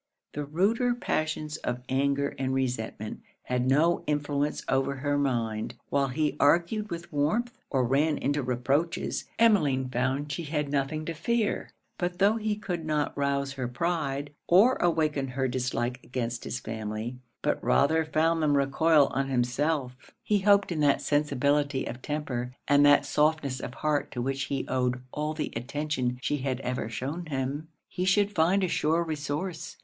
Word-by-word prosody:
The 145 Hz, 0 st, -3 dB
ruder 220 Hz, -, +1 dB
passions 155 Hz, -7 st, -2 dB
of 125 Hz, -4 st, -4 dB
anger 140 Hz, +1 st, +1 dB
and 130 Hz, 0 st, 0 dB
resentment 115 Hz, -4 st, -3 dB, 0.2 s
had 125 Hz, 0 st, -1 dB
no 155 Hz, +6 st, +3 dB
influence 145 Hz, 0 st, -1 dB
over 135 Hz, +1 st, +1 dB
her 145 Hz, +2 st, -1 dB
mind. 115 Hz, -6 st, -1 dB, 0.2 s
While 140 Hz, -1 st, +2 dB
he 150 Hz, +2 st, 0 dB
argued 175 Hz, +8 st, +3 dB
with 170 Hz, -2 st, -7 dB
warmth, 220 Hz, -, 0 dB
or 130 Hz, -3 st, +1 dB
ran 145 Hz, +4 st, +2 dB
into 145 Hz, +1 st, 0 dB
reproaches, 135 Hz, +6 st, -1 dB
Emmeline 150 Hz, -, +3 dB
found 130 Hz, +4 st, -1 dB
she 160 Hz, +3 st, -3 dB
had 150 Hz, -1 st, -2 dB
nothing 145 Hz, +2 st, -1 dB
to 165 Hz, -, -3 dB
fear. 215 Hz, +7 st, -1 dB, 0.3 s
But 175 Hz, 0 st, -2 dB
tho' 200 Hz, +4 st, +4 dB
he 215 Hz, -1 st, -1 dB
could 190 Hz, -5 st, -4 dB
not 150 Hz, -2 st, -1 dB
rouse 140 Hz, -1 st, 0 dB
her 130 Hz, -3 st, -3 dB
pride, 145 Hz, 0 st, -2 dB
or 205 Hz, +9 st, +6 dB
awaken 155 Hz, -5 st, +1 dB
her 130 Hz, +1 st, -1 dB
dislike 125 Hz, -1 st, -2 dB
against 120 Hz, -1 st, -4 dB
his 125 Hz, -, -3 dB
family, 110 Hz, +2 st, -5 dB, 0.2 s
but -, -, 0 dB
rather 160 Hz, +3 st, +3 dB
found 160 Hz, +1 st, +1 dB
them 145 Hz, -2 st, +3 dB
recoil 145 Hz, +2 st, +4 dB
on 135 Hz, 0 st, 0 dB
himself; 130 Hz, +2 st, 0 dB, 0.3 s
he 210 Hz, -1 st, +2 dB
hoped 200 Hz, 0 st, +4 dB
in 165 Hz, -, -2 dB
that 145 Hz, -2 st, +3 dB
sensibility 145 Hz, -1 st, +1 dB
of 120 Hz, -, -6 dB
temper 130 Hz, -5 st, -3 dB
and 145 Hz, 0 st, +5 dB
that 145 Hz, 0 st, +6 dB
softness 150 Hz, -2 st, +1 dB
of 125 Hz, -, -6 dB
heart 150 Hz, +2 st, 0 dB
to 125 Hz, -, -4 dB
which 135 Hz, +2 st, -1 dB
he 140 Hz, -1 st, -2 dB
owed 125 Hz, -1 st, 0 dB
all 150 Hz, +1 st, -2 dB
the 155 Hz, -, -3 dB
attention 130 Hz, 0 st, -2 dB
she 145 Hz, -, 0 dB
had 130 Hz, -2 st, -2 dB
ever 125 Hz, -3 st, -3 dB
shewn 145 Hz, +9 st, -4 dB
him, 140 Hz, +2 st, -3 dB, 0.2 s
he 180 Hz, -, -3 dB
should 200 Hz, +2 st, +3 dB
find 180 Hz, +3 st, +3 dB
a -, -, +2 dB
sure 165 Hz, 0 st, +1 dB
resource. 155 Hz, +2 st, -4 dB
145 Hz, 165 wpm, -28 LUFS, 130-160 Hz, 0.3 s, or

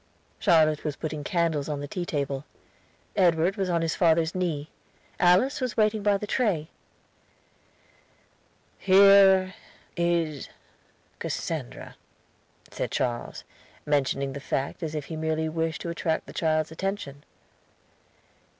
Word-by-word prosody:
Charlotte 155 Hz, -2 st, +3 dB
was 150 Hz, -2 st, -3 dB
putting 155 Hz, -1 st, -5 dB
candles 160 Hz, -3 st, 0 dB
on 145 Hz, -1 st, -3 dB
the 145 Hz, -, -5 dB
tea 175 Hz, +3 st, -5 dB
table. 140 Hz, -2 st, -2 dB, 0.7 s
Edward 175 Hz, -1 st, +3 dB
was 190 Hz, -2 st, -2 dB
on 170 Hz, -1 st, +1 dB
his 165 Hz, -, 0 dB
father's 165 Hz, -1 st, +2 dB
knee; 165 Hz, -5 st, -2 dB, 0.5 s
Alice 190 Hz, +12 st, +3 dB
was 255 Hz, -2 st, -3 dB
waiting 215 Hz, -1 st, +2 dB
by 200 Hz, 0 st, +2 dB
the 210 Hz, -, -5 dB
tray. 200 Hz, -9 st, 0 dB, 2.1 s
"Here 195 Hz, -1 st, +6 dB, 0.4 s
is 170 Hz, -4 st, -1 dB, 0.7 s
Cassandra," -, -, -5 dB, 0.7 s
said -, -, -3 dB
Charles, 120 Hz, -1 st, -3 dB, 0.4 s
mentioning 140 Hz, -2 st, 0 dB
the 140 Hz, -, -6 dB
fact 140 Hz, +3 st, -3 dB
as 160 Hz, -2 st, -4 dB
if 150 Hz, -2 st, -4 dB
he 160 Hz, -, -7 dB
merely 160 Hz, 0 st, -1 dB
wished 160 Hz, -1 st, -2 dB
to 170 Hz, -, -4 dB
attract 165 Hz, -1 st, -2 dB
the -, -, -11 dB
child's 155 Hz, -1 st, 0 dB
attention. 160 Hz, -6 st, -4 dB
165 Hz, 125 wpm, -26 LUFS, 150-185 Hz, 2.1 s, Here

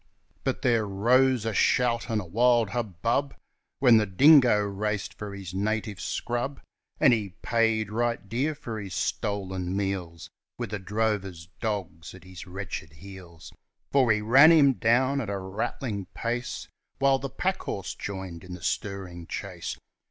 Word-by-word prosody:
But -, -, -2 dB
there 115 Hz, -4 st, +2 dB
rose 120 Hz, +4 st, +3 dB
a 115 Hz, -, -1 dB
shout 120 Hz, +3 st, +2 dB
and 110 Hz, -2 st, +1 dB
a 100 Hz, -, -5 dB
wild 115 Hz, +3 st, +3 dB
hubbub 120 Hz, -, -1 dB, 0.4 s
When 125 Hz, -4 st, +6 dB
the 105 Hz, -1 st, +2 dB
dingo 130 Hz, -, +6 dB
raced 105 Hz, 0 st, -2 dB
for 100 Hz, 0 st, -7 dB
his 95 Hz, -3 st, -8 dB
native 105 Hz, -1 st, -2 dB
scrub, 120 Hz, -, -3 dB, 0.4 s
And 140 Hz, -5 st, +6 dB
he 100 Hz, -5 st, -2 dB
paid 115 Hz, -2 st, +1 dB
right 115 Hz, -1 st, -1 dB
dear 135 Hz, +9 st, -1 dB
for 115 Hz, -5 st, -6 dB
his 100 Hz, -3 st, -6 dB
stolen 95 Hz, -3 st, -2 dB
meals 95 Hz, -5 st, -3 dB, 0.3 s
With -, -, -5 dB
the 105 Hz, -, -3 dB
drover's 95 Hz, -4 st, -2 dB
dogs 95 Hz, -8 st, -4 dB
at 90 Hz, -, -14 dB
his 95 Hz, 0 st, -11 dB
wretched 90 Hz, -4 st, -6 dB
heels. 90 Hz, 0 st, -12 dB, 0.4 s
For 135 Hz, -1 st, +5 dB
we 105 Hz, -3 st, +2 dB
ran 135 Hz, +9 st, +7 dB
him 145 Hz, -5 st, +6 dB
down 130 Hz, +4 st, +2 dB
at 110 Hz, -, -5 dB
a 100 Hz, -, -2 dB
rattling 100 Hz, +2 st, -4 dB
pace, 120 Hz, +1 st, -3 dB, 0.3 s
While 135 Hz, 0 st, +3 dB
the 140 Hz, -, -4 dB
packhorse 135 Hz, -, -3 dB
joined 95 Hz, -4 st, -6 dB
in 90 Hz, -1 st, -8 dB
the 85 Hz, -, -12 dB
stirring 90 Hz, -3 st, -4 dB
chase. -, -, -5 dB
105 Hz, 150 wpm, -27 LUFS, 95-120 Hz, 0.4 s, ran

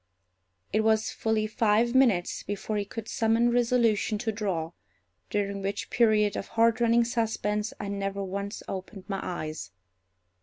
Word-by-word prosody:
It 215 Hz, -, +3 dB
was 220 Hz, 0 st, +2 dB
fully 220 Hz, -1 st, 0 dB
five 220 Hz, +2 st, +2 dB
minutes 235 Hz, -10 st, +3 dB
before 205 Hz, +2 st, -4 dB
he 205 Hz, -, -1 dB
could 225 Hz, +2 st, -7 dB
summon 230 Hz, +1 st, +2 dB
resolution 235 Hz, -3 st, +2 dB
to 220 Hz, +1 st, -2 dB
draw, 190 Hz, -7 st, -2 dB, 0.6 s
during 200 Hz, -1 st, -1 dB
which 195 Hz, +1 st, -3 dB
period 215 Hz, -3 st, +3 dB
of -, -, -4 dB
heartrending 230 Hz, +1 st, +3 dB
suspense 220 Hz, -2 st, -1 dB
I 205 Hz, -, -4 dB
never 200 Hz, 0 st, -3 dB
once 200 Hz, +2 st, -5 dB
opened 190 Hz, +1 st, -6 dB
my 195 Hz, -2 st, -2 dB
eyes. 155 Hz, -3 st, -5 dB
215 Hz, 140 wpm, -28 LUFS, 200-230 Hz, 0.6 s, It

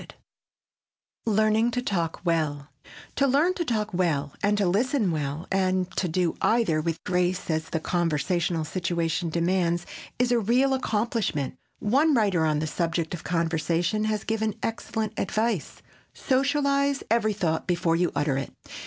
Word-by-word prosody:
[Sidenote: -, -, -13 dB, 1.1 s
LEARNING 220 Hz, +2 st, +3 dB
TO 245 Hz, +1 st, -1 dB
TALK 170 Hz, -7 st, -2 dB
WELL] 155 Hz, -4 st, 0 dB, 0.5 s
To 275 Hz, -, +3 dB
learn 295 Hz, +7 st, +3 dB
to 360 Hz, -, -2 dB
talk 220 Hz, -, -1 dB
well 150 Hz, -6 st, 0 dB
and 205 Hz, +1 st, +2 dB
to 205 Hz, -, +2 dB
listen 220 Hz, +2 st, +1 dB
well 150 Hz, +1 st, -3 dB
and 185 Hz, -1 st, +1 dB
to 185 Hz, -, 0 dB
do 175 Hz, 0 st, 0 dB
either 220 Hz, -10 st, +2 dB
with 165 Hz, +1 st, -3 dB
grace 180 Hz, -1 st, 0 dB
as 160 Hz, 0 st, -2 dB
the 165 Hz, -, -1 dB
conversational 170 Hz, 0 st, 0 dB
situation 170 Hz, 0 st, -1 dB
demands 175 Hz, +1 st, +1 dB, 0.3 s
is 245 Hz, 0 st, +2 dB
a 240 Hz, -, +4 dB
real 250 Hz, +5 st, +2 dB
accomplishment. 215 Hz, -, -1 dB, 0.2 s
One 280 Hz, +8 st, +3 dB
writer 195 Hz, -8 st, +2 dB
on 155 Hz, -1 st, +1 dB
the 155 Hz, -, -1 dB
subject 165 Hz, +1 st, -1 dB
of 175 Hz, -, -6 dB
conversation 170 Hz, +4 st, 0 dB
has 215 Hz, -1 st, -1 dB
given 220 Hz, -2 st, -1 dB
excellent 220 Hz, -1 st, -2 dB
advice: 220 Hz, -6 st, -1 dB, 0.3 s
"Socialize 280 Hz, +1 st, +1 dB
every 220 Hz, -2 st, +3 dB
thought 165 Hz, -5 st, -1 dB
before 170 Hz, -2 st, +1 dB
you 175 Hz, +1 st, +1 dB
utter 145 Hz, -3 st, +1 dB
it." 135 Hz, -, -5 dB
185 Hz, 150 wpm, -26 LUFS, 165-225 Hz, 1.1 s, a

